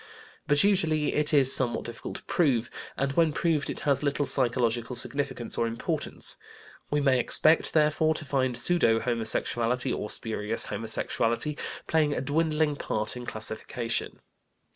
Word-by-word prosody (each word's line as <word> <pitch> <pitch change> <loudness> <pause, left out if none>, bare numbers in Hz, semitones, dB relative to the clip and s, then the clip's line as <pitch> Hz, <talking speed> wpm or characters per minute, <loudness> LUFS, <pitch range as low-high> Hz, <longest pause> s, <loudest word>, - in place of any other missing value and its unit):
But 145 0 +3
usually 160 -7 +1
it 150 0 +1
is 135 -3 +4
somewhat 125 -2 0
difficult 120 -1 -7
to - - -3
prove, 130 -8 0 0.3
and 135 +1 0
when 160 +2 +2
proved 155 -1 0
it - - -5
has 140 -2 +1
little 145 0 0
psychological 120 -2 0
significance 135 -1 -1
or 115 - +1
importance. 115 0 -2 0.5
We 150 - 0
may 135 -3 +3
expect, 155 +5 +3
therefore, 155 +1 +2
to 155 - -5
find 130 -3 0
"pseudo 125 -7 +2
homosexuality," 120 +1 -1
or 105 - -4
spurious 110 0 0
homosexuality, 115 +4 -1 0.3
playing 155 -2 +1
a - - -2
dwindling 150 +1 0
part 110 -3 -2
in 125 -1 -8
classification. 110 +2 -1
135 Hz, 140 wpm, -27 LUFS, 120-150 Hz, 0.5 s, is